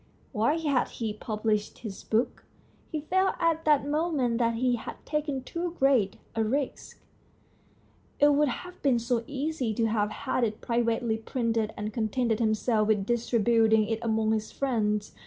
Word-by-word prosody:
Why 235 +9 +1
had 290 -6 +1
he 220 -3 -4
published 215 -1 -2
his 215 -5 -8
book? 225 +3 0 0.5
He 310 - -2
felt 375 +5 +1
at 330 -1 +1
that 295 -3 +4
moment 290 -6 0
that 230 -1 +2
he 250 +1 +2
had - - -7
taken 295 -4 -2
too 340 +4 -4
great 260 -8 +3 0.2
a 225 - +2
risk. 265 +5 -3 1.2
It 290 - +6
would 295 +1 +3
have 360 +8 -6
been 270 -4 +3
so 235 0 0
easy 280 -5 -2
to 230 - +1
have 215 -2 +1
had 250 - -2
it 215 -2 -1
privately 235 -1 0
printed 225 -2 -1
and 210 0 -4
contented 225 0 0
himself 215 -1 +1
with 205 -3 +2
distributing 225 -1 +3
it 225 -1 -1
among 220 -1 +1
his 220 -1 -1
friends. 210 -6 -1
235 Hz, 155 wpm, -28 LUFS, 220-280 Hz, 1.2 s, It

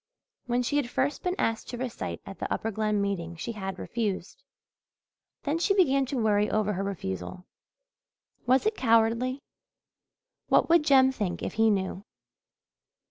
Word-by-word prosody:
When 245 0 +1
she 285 +4 0
had 270 -5 0
first 270 +4 -1
been 360 0 -1
asked 225 - -1
to 245 - -5
recite 230 - -4
at 195 - -9
the - - -4
Upper 225 - -1
Glen 215 0 0
meeting 175 -4 -3
she 175 +7 -5
had 195 -3 -5
refused. 205 -3 -3 1.0
Then 300 +3 0
she 395 +3 +2
began 275 -8 +3
to 270 - -3
worry 210 -2 +2
over 210 -1 +1
her 195 +1 -2
refusal. 180 - -5 1.0
Was 260 +7 +4
it 435 - +2
cowardly? 230 +3 +2 1.0
What - - +3
would 340 -2 +6
Jem 265 -2 +6
think 205 -9 -3
if - - -3
he 225 0 +3
knew? 190 -1 -1
225 Hz, 155 wpm, -28 LUFS, 195-260 Hz, 1.0 s, would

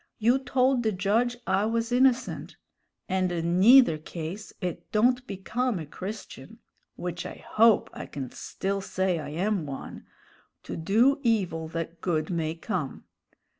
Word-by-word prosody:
You 240 +4 +3
told 260 0 +2
the 220 -2 +1
judge 215 +6 +1
I 190 +2 +2
was 230 +1 -1
innocent; 255 0 +1 0.5
and 185 -1 0
in 170 +1 0
neither 235 -6 +7
case 170 +6 -7
it 180 -4 -5
don't 245 +4 +2
become 220 +4 -2
a 160 - -5
Christian 190 +8 -8 0.4
(which 175 -1 -4
I - - -9
hope 225 0 +4
I - - -7
can 135 -4 -6
still 195 +1 -3
say 190 -2 -1
I 145 -2 -6
am 180 +1 -1
one) 135 -1 -8 0.6
to - - -6
'do 230 - +3
evil 190 - 0
that 165 +1 -5
good 160 -2 -1
may 160 -2 -1
come.' 155 -4 -4
195 Hz, 145 wpm, -27 LUFS, 165-230 Hz, 0.6 s, neither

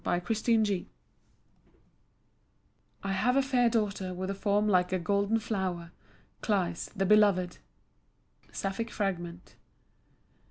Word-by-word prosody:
To 175 - +1
Cleis 215 0 +1 2.2
"I 195 - -2
have 230 +7 +2
a 275 - +4
fair 250 -3 +3
daughter 200 -5 -1
with 185 +2 -3
a - - -2
form 205 +1 +1
like 180 -3 +3
a 185 - +2
golden 200 +4 +1
flower, 190 -6 -3 0.5
Cleis, 180 -6 -1
the 195 -1 0
beloved." 200 -3 +3 0.9
Sapphic 195 +4 -3
fragment. 175 -5 -4
200 Hz, 110 wpm, -30 LUFS, 185-215 Hz, 2.2 s, a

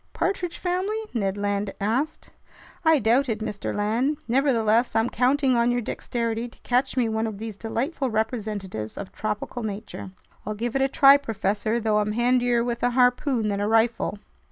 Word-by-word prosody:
"Partridge 360 -3 -2
family?" 370 +4 -1 0.2
Ned 200 -4 -1
Land 205 0 -1
asked. 255 +10 -2 0.5
"I 320 -1 +5
doubt 250 +3 +2
it, 220 - 0
Mr. 215 -2 -4
Land. 230 +8 0
Nevertheless, 240 -3 +2
I'm 225 +2 +2
counting 260 +1 +2
on 235 0 +3
your 245 0 +1
dexterity 230 0 -3
to - - -21
catch 255 +2 0
me 245 -2 +3
one 220 0 -1
of 215 -2 -5
these 220 0 -6
delightful 255 - -2
representatives 210 - -3
of 200 - -6
tropical 215 +3 -4
nature!" 210 -2 -6 0.3
"I'll 215 +1 -4
give 235 +3 -3
it 270 - +2
a 270 - +4
try, 275 +1 +7
professor, 220 -3 -1
though 215 -2 +1
I'm 210 0 -1
handier 245 0 +2
with 235 -1 -3
a 245 - +3
harpoon 250 -2 +2
than 200 -1 -1
a 205 - 0
rifle." 225 -1 +1
230 Hz, 175 wpm, -25 LUFS, 215-255 Hz, 0.5 s, try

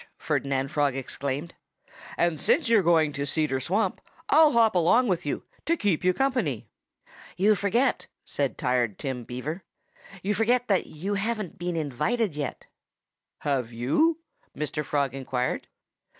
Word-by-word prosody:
Ferdinand 135 -1 -1
Frog 145 -3 +1
exclaimed. 140 +4 -4 0.6
"And 170 -4 +1
since 315 -6 +3
you're 230 -3 +5
going 160 -4 +3
to 140 0 -3
Cedar 145 -1 0
Swamp, 190 - 0 0.3
I'll 315 -2 +6
hop 230 -2 +4
along 185 +8 +4
with 175 -5 -1
you, - - -2 0.2
to 335 +1 +2
keep 195 - 0
you 185 - +4
company." 225 - -1 0.7
"You 205 +4 +5
forget 220 +6 +1
" - - -55
said 140 -2 0
Tired 120 -5 0
Tim 130 -3 -4
Beaver 145 - -5 0.6
"you 205 +2 +1
forget 240 +4 +2
that 195 -3 +2
you 185 +7 -4
haven't 210 -3 -2
been 175 0 -2
invited 165 - -1
yet." 145 -3 -4 0.8
"Have 130 -5 -1
you?" 145 - +2 0.4
Mr. 150 +1 -2
Frog 140 -2 0
inquired. 130 -2 -2
160 Hz, 145 wpm, -26 LUFS, 135-210 Hz, 0.8 s, I'll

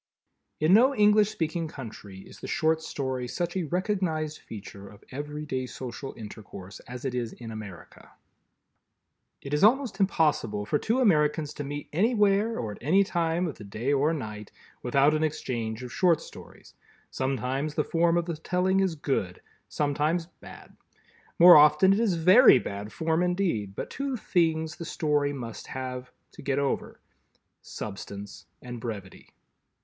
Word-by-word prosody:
In 155 +4 +4
no 255 +6 +6
English 210 0 +5
speaking 165 -4 -2
country 110 -8 -9
is - - -14
the - - -7
Short 160 0 +1
Story 130 -5 -3
such 175 +7 -3
a 185 -3 -1
recognized 170 -4 -1
feature 100 -2 -10
of 105 - -16
everyday 145 -2 -4
social 130 +2 -7
intercourse 100 -4 -10
as 125 +1 -8
it 130 - -2
is 120 -2 -3
in 115 -2 -9
America. 105 -6 -10 1.3
It 140 - -6
is 150 - +1
almost 235 -2 +3
impossible 150 - +1
for 145 +7 0
two 240 +4 0
Americans 150 - +2
to 145 - -5
meet 145 +1 -6
anywhere 210 +2 +2
or 110 -3 -3
at - - -10
any 185 +9 +4
time 170 -2 0
of 155 - -5
the - - -8
day 110 +7 -2
or 145 +3 +2
night 110 -9 -6 0.3
without 135 +4 +3
an 155 0 +1
exchange 120 -6 -3
of 125 - -8
Short 175 -4 +3
Stories. - - -13 0.4
Sometimes 135 +3 -2
the 150 - +1
form 170 +2 +2
of 170 - 0
the 170 -3 -4
telling 180 +4 +1
is 190 -4 +1
good, 135 - -2 0.3
sometimes 150 +3 0
bad. 175 - -15 0.6
More 175 +1 +10
often 150 +6 +6
it 200 - +1
is 220 -6 +2
very 185 - +7
bad 105 -2 -5
form 160 +7 0
indeed, 175 - -1
but - - -5
two 275 -1 -3
things 160 -5 0
the - - -6
Story 150 -3 0
must 120 -6 -7
have—to 130 -1 -8
"get 135 0 -1
over"—substance 100 -7 -7 0.2
and 120 -2 -7
brevity. 100 -6 -8
150 Hz, 155 wpm, -27 LUFS, 125-175 Hz, 1.3 s, More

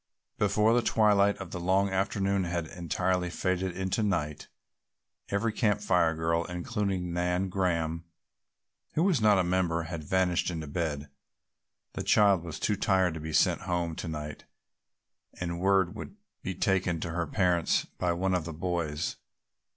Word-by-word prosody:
Before 105 +2 +3
the 120 - +4
twilight 105 -3 +3
of 95 -3 -8
the 90 - -4
long 95 +3 +2
afternoon 95 0 0
had 85 -1 -2
entirely 90 +2 -1
faded 95 0 -2
into 95 +3 -1
night, 75 -8 -1 0.8
every 105 +2 0
Camp 105 -2 +1
Fire 90 -5 +2
girl, 85 +1 0
including 90 0 -2
Nan 90 +2 0
Graham, 85 -3 -1 0.9
who 160 - +3
was 180 - +2
not 105 -2 +5
a 95 - +3
member, 85 -2 0
had 80 -1 -6
vanished 90 +2 +1
into 80 -3 -4
bed. 75 -1 -3 0.9
The - - -4
child 100 -5 +4
was 80 -3 -6
too 105 - 0
tired 95 -4 +2
to 80 - -6
be 80 +1 -5
sent - - +3
home 85 -2 -2
to - - -5
night 75 -1 -6 0.9
and 85 -1 -3
word 95 -1 +3
would 110 - -8 0.3
be 95 - -4
taken 90 -2 +1
to 85 - -3
her 85 0 -2
parents 90 -1 +1
by 90 - -2
one 95 +2 0
of 90 -3 0
the 85 - -5
boys. 85 -2 -2
90 Hz, 160 wpm, -29 LUFS, 85-95 Hz, 0.9 s, not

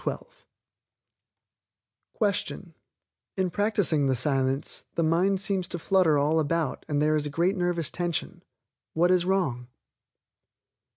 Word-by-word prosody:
Question 195 -4 -2 0.6
In 185 -2 0
practicing 205 -8 +1
the 130 - +1
Silence, 135 +1 0
the 165 - +1
mind 180 +5 +2
seems 190 -2 -1
to 175 - -5
flutter 170 -3 +2
all 150 +3 +2
about 160 -1 -1
and 145 -1 0
there 155 +1 +2
is 150 -1 0
great 170 +7 0
nervous 175 -5 -1
tension. 175 -2 -3 0.5
What 175 +3 +3
is 180 -1 +3
wrong? 170 -11 -1
170 Hz, 115 wpm, -26 LUFS, 150-185 Hz, 0.6 s, What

